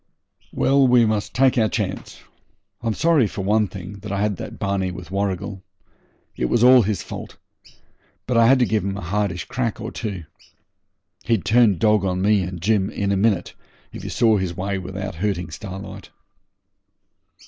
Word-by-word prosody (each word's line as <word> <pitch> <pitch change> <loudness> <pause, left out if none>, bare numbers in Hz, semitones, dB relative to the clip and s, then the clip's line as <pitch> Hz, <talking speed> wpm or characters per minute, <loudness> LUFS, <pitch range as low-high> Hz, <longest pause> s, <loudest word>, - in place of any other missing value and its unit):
'Well, 135 0 +3
we 125 -2 +5
must 110 -2 -2
take 130 -1 +3
our 110 -1 +2
chance. - - -4 0.6
I'm 115 -2 -1
sorry, 160 -8 +3
for 100 - -5
one 105 +2 +2
thing, 95 +1 -9
that 105 0 -8
I 100 - -1
had 105 -2 0
that - - -7
barney 100 -2 -1
with 90 0 -9
Warrigal. 95 -1 -3 0.7
It - - -1
was 115 - +2
all 125 0 +8
his 105 -1 -2
fault. - - -8 0.9
But 125 - -1
I 115 0 +5
had 135 +2 +6
to 125 - +3
give 110 -4 0
him 100 0 -3
a - - -6
hardish 95 -1 -2
crack 120 -3 -3
or 110 +2 -5
two. 100 -7 -5 1.0
He'd 110 -7 0
turn 110 -4 +4
dog 105 +1 +3
on 90 -1 -1
me 100 +1 +3
and 90 -1 -5
Jim, 100 -2 +2
and - - -13
in 100 -1 0
a - - +2
minute, 100 -3 +1 0.4
if - - -8
he - - -6
saw 110 -3 +3
his 90 -3 -3
way 95 +1 -2
without 95 +2 -6
hurting 95 -6 -2
Starlight.' 95 +2 -8
100 Hz, 180 wpm, -22 LUFS, 95-110 Hz, 1.0 s, all